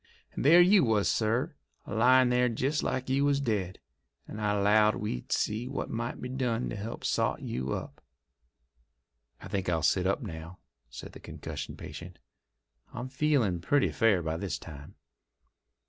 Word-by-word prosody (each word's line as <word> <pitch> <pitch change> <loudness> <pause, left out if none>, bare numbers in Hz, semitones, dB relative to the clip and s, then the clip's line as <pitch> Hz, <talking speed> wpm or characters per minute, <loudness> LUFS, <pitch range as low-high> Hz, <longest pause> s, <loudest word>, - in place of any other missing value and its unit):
And - - -4
there 165 +6 +8
you 185 0 +6
was, 110 -4 +2
sir, 120 +9 0 0.3
a - - -7
lyin' 125 +3 +5
there 125 0 +3
jest 135 +6 -1
like 130 0 -2
you 135 +2 +1
was 140 -1 +2
dead, 105 -8 -2 0.5
and 110 - -7
I 105 -1 +1
'lowed 105 +1 +4
we'd 60 - -5
see 110 +4 0
what 135 - -4
might 120 +1 -3
be 125 - -5
done 125 -2 -2
to - - -4
help 110 +3 -6
sot - - 0
you 65 +1 -3
up." - - -6 1.4
"I - - -8
think 95 -2 -2
I'll 80 -3 0
sit 90 +5 +2
up 95 - 0
now," 80 +3 -8 0.3
said - - -9
the - - -12
concussion 75 -3 -7
patient. 85 +1 -9 0.7
"I'm 125 +2 -6
feeling 130 - +1
pretty 145 +9 +2
fair 105 -7 +2
by 80 0 -2
this 95 -2 -3
time." 75 -3 -11
110 Hz, 165 wpm, -29 LUFS, 95-130 Hz, 1.4 s, there